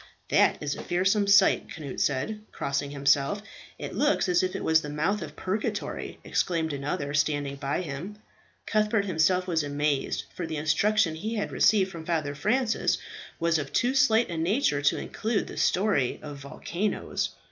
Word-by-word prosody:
"That - - +3
is 145 -1 -1
a - - -7
fearsome 195 +3 +1
sight," 200 -1 +5
Cnut 140 -5 -7
said, 150 +11 -1
crossing 140 +1 -2
himself. 140 +7 +1 0.3
"It - - -6
looks 295 -7 +2
as 180 -1 +3
if 185 0 -2
it - - -4
was 160 0 +4
the 150 - -6
mouth 165 +8 0
of - - -7
purgatory," 205 +3 -3
exclaimed 160 -3 0
another, 140 0 -3
standing 145 -1 0
by. 140 +5 -2 0.8
Cuthbert 215 -1 +1
himself 180 0 +2
was 170 -3 +1
amazed, 145 -1 -1
for 175 - -4
the 160 -1 -4
instruction 180 +4 +2
he 215 +8 -4
had 210 - -2
received 200 -3 +3
from 165 -2 -8
Father 155 -4 -1
Francis 220 - +1 0.4
was 165 -1 +2
of 145 -1 -5
too 245 +2 +2
slight 240 -7 +3
a 170 - -3
nature 165 - +1
to 145 - +2
include 220 -2 -2
the - - -9
story 185 - +2
of 145 -2 -7
volcanoes. 170 +8 -3
165 Hz, 165 wpm, -27 LUFS, 145-205 Hz, 0.8 s, sight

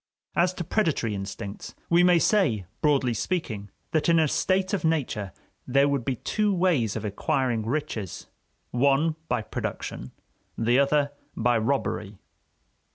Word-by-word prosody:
As 175 +1 +3
to 175 - -3
predatory 160 - 0
instincts, 100 +2 -6
we 170 +1 +4
may 180 -1 +6
say, 165 - +2 0.2
broadly 140 -5 +3
speaking, 110 - -3 0.2
that 155 +1 +1
in 165 - +5
a 160 -1 +4
state 190 +6 +1
of 200 - 0
nature 135 - 0 0.4
there 140 +2 +4
would 140 -3 0
be 130 +2 -1
two 210 - 0
ways 175 - +2
of - - -4
acquiring 115 +2 0
riches 115 - -3 0.5
one 140 +5 +2
by 125 -3 0
production, 65 - -5 0.5
the 120 +3 +3
other 140 +1 +2 0.2
by 120 +1 +2
robbery. 110 -4 -1
135 Hz, 140 wpm, -26 LUFS, 115-165 Hz, 0.5 s, may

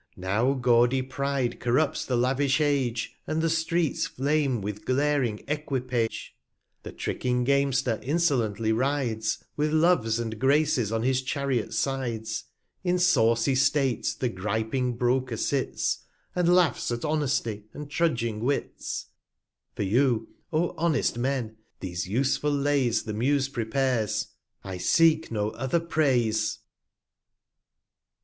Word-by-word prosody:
j& - - -13
Now 105 +8 +1
gaudy 125 0 +3
Pride 135 -2 -2
corrupts 130 +5 +1
the 125 - -1
lavish 130 +3 +2
Age, 135 -6 0
And 155 - -1
the 165 0 +1
Streets 165 -1 0
flame 140 -2 0
with 105 +1 -5
glaring 135 -5 0
Equipage; 130 -6 -2 0.2
\ - - -51
The - - -8
tricking 125 0 -1
Gamester 135 -3 +1
insolently 125 -8 +1
rides, 120 -3 0 0.2
115 - - -46
With 150 +1 +1
Loves 155 -9 +3
and 110 -2 -4
Graces 140 -4 +2
on 115 0 -1
his 130 +1 +2
Chariots 130 -4 -2
Sides; 115 -4 -2 0.4
In 180 -1 +1
sawcy 125 -9 +3
State 135 -1 +1
the 125 - 0
griping 110 +5 -2
Broker 125 -1 0
sits, 135 +3 -1 0.4
And 180 -1 +2
laughs 180 -3 +3
at 120 +2 -2
Honesty, 130 -9 -1
and 150 0 -8
trudging 120 -9 0
Wits: 135 +5 -2 0.7
For - - -2
you, 115 +2 +2 0.2
O 165 +2 +1
honest 155 -7 +1
Men, 120 -4 -2 0.2
these 90 -2 -4
useful 135 +7 +1
Lays 140 -4 +1
The 110 - -5
Muse 135 +5 +1
prepares; 115 -3 -1 0.3
I 95 -2 -6
seek 160 - +3
no 105 -1 -1
other 135 +7 -1
Praise. 120 -10 +1
130 Hz, 130 wpm, -27 LUFS, 115-145 Hz, 0.7 s, gaudy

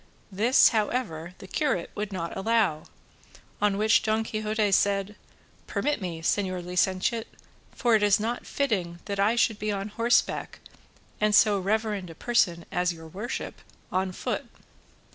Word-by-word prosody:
This, 225 +7 +5
however, 205 -7 -2
the - - -11
curate 260 - -1
would 210 0 -4
not 170 -3 -4
allow, 195 -6 +1 0.8
on 205 -1 +2
which 215 +2 +4
Don 220 0 +1
Quixote 215 -1 -1
said, 200 +1 +2 0.5
"Permit 295 -5 -1
me, 170 -3 -5
señor 185 -1 0
licentiate, 185 +5 0 0.5
for 240 -2 +1
it 220 - +4
is 205 -1 +4
not 230 +3 -3
fitting 190 -11 -1
that 200 -1 -4
I 210 +4 +3
should 225 -2 +2
be 215 +1 -1
on 200 +1 -3
horseback 230 +3 +1 0.6
and 210 0 +3
so 210 -2 +5
reverend 205 -1 -1
a 165 - -10
person 175 -6 +1
as 180 0 +1
your 160 -1 -10
worship 210 +9 -5 0.3
on 185 0 0
foot." - - -4
205 Hz, 145 wpm, -27 LUFS, 185-220 Hz, 0.8 s, This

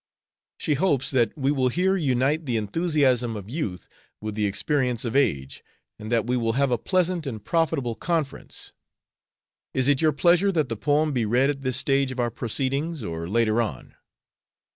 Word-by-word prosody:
She 150 - 0
hopes 145 -3 +1
that 120 -5 +2
we 135 0 +1
will 130 -3 +1
here 185 +8 +1
unite 145 -1 0
the 120 -2 0
enthusiasm 125 - +1
of 105 +1 -8
youth 115 - -4 0.3
with 110 0 -5
the 105 0 0
experience 125 +4 0
of 115 - -3
age, 70 - 0 0.4
and 110 +1 -7
that 115 -2 +2
we 125 +1 0
will 115 -2 0
have 135 +1 +1
a 120 - +1
pleasant 180 -4 0
and 110 -6 -6
profitable 160 -8 0
conference. 160 +1 -4 1.0
Is 130 0 +1
it 145 -2 +3
your 155 -1 +4
pleasure 175 +7 +3
that 155 -6 0
the 115 - -2
poem 150 +6 +1
be 120 -4 0
read 130 +6 +3
at 140 -1 -7
this 130 -1 0
stage 135 0 +1
of 130 - -6
our 120 -1 0
proceedings, 135 +6 -2
or 85 -3 -5
later 115 +1 +2
on?" 105 - -5
130 Hz, 180 wpm, -25 LUFS, 115-150 Hz, 1.0 s, your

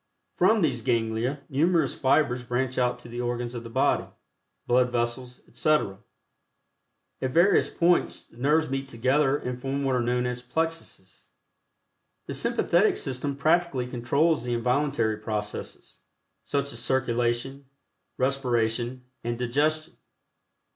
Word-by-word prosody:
From 220 -4 +4
these 130 -7 +1
ganglia 115 +3 0
numerous 165 +5 +2
fibers 130 -2 +2
branch 125 +1 -1
out 125 -1 +1
to 120 - -12
the 120 +1 -5
organs 120 0 -3
of 120 -1 -6
the 115 - -8
body, 115 - +1 0.6
blood 125 0 +3
vessels, 125 +1 -2
etc. 150 -11 +1 1.2
At 130 - 0
various 175 +8 +4
points, 175 +1 +1
the - - -22
nerves 150 +5 +2
meet 135 +1 -3
together 135 +3 +2
and 125 -2 -5
form 135 +1 -2
what 135 -1 +1
are 125 - +1
known 125 +1 0
as 125 0 -3
plexuses. 140 - -4 1.0
The - - -5
Sympathetic - - +2
System 135 +2 -2
practically 155 -3 +1
controls 125 +4 +1
the 120 -1 -1
involuntary 125 -2 +1
processes, 105 -1 -5 0.4
such 140 -1 -2
as 115 - -4
circulation, 125 +2 0 0.5
respiration 125 -2 0 0.2
and 120 0 -2
digestion. 150 +6 0
125 Hz, 125 wpm, -26 LUFS, 120-140 Hz, 1.2 s, From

